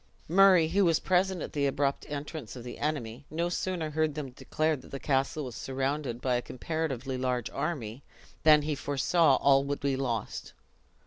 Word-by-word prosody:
Murray, 180 -2 +6
who 200 +4 +3
was 165 -3 +3
present 185 -2 +1
at - - -7
the 140 -1 +1
abrupt 140 0 -1
entrance 145 -3 -6
of 120 - -8
the 120 - -8
enemy, 140 -5 -3
no 170 +3 -1
sooner 175 -3 -2
heard 155 -1 0
them 145 -4 -5
declare 155 +5 -1
that 130 - -13
the 140 - -6
castle 140 +2 0
was 125 - -7
surrounded 135 -2 -2
by 125 -2 +1
a - - -2
comparatively 135 -2 -3
large 125 -2 -1
army, 125 -7 -3 0.4
than 150 -2 +6
he 150 +1 -1
foresaw 145 +2 +2
all 135 0 +4
would 140 0 -3
be 140 -1 +1
lost. 120 -5 -3
145 Hz, 180 wpm, -29 LUFS, 130-160 Hz, 0.4 s, Murray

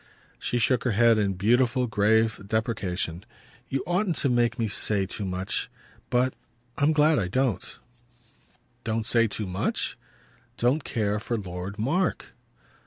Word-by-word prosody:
She 120 - -1
shook 125 +1 +2
her 125 - +1
head 115 -1 +5
in 100 -2 +1
beautiful 120 +6 +2
grave 110 0 +2
deprecation. 95 -6 -2 0.5
"You 135 - -1
oughtn't 175 +1 +1
to 140 - +1
make 120 -1 +2
me 115 -2 0
say 100 0 +1
too 100 +1 -5
much. 95 0 -3 0.4
But 125 +1 +2 0.4
I'm 145 +2 +3
glad 155 0 +4
I 90 - -1
don't." 115 -1 -1 1.1
"Don't 110 0 -1
say 115 0 +4
too 105 0 -3
much?" 90 0 -2 0.6
"Don't 130 +5 +2
care 105 -4 -1
for 115 +2 -2
Lord 95 0 -6
Mark." 160 - -1
115 Hz, 140 wpm, -26 LUFS, 100-125 Hz, 1.1 s, head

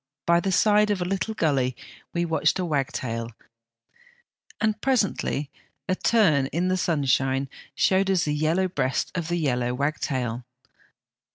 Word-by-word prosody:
By 170 0 +4
the 195 +2 -1
side 210 +3 +4
of 205 -2 0
a 180 - -1
little 195 +4 -2
gully 135 - +1 0.4
we 170 0 -1
watched 160 0 +1
a 185 - -1
wag 145 -5 0
tail, 115 -2 -4 1.3
and 215 0 0
presently 200 - 0 0.4
a 185 - +1
turn 175 -10 +3
in 175 +6 -1
the 185 - +2
sunshine 135 -5 +1 0.3
showed 190 +1 +2
us 185 -2 +2
the 150 - 0
yellow 160 +5 +1
breast 130 -7 -1
of 170 -3 -3
the 175 +1 -1
yellow 125 -6 0
wagtail. 130 -4 -2
165 Hz, 150 wpm, -25 LUFS, 135-190 Hz, 1.3 s, By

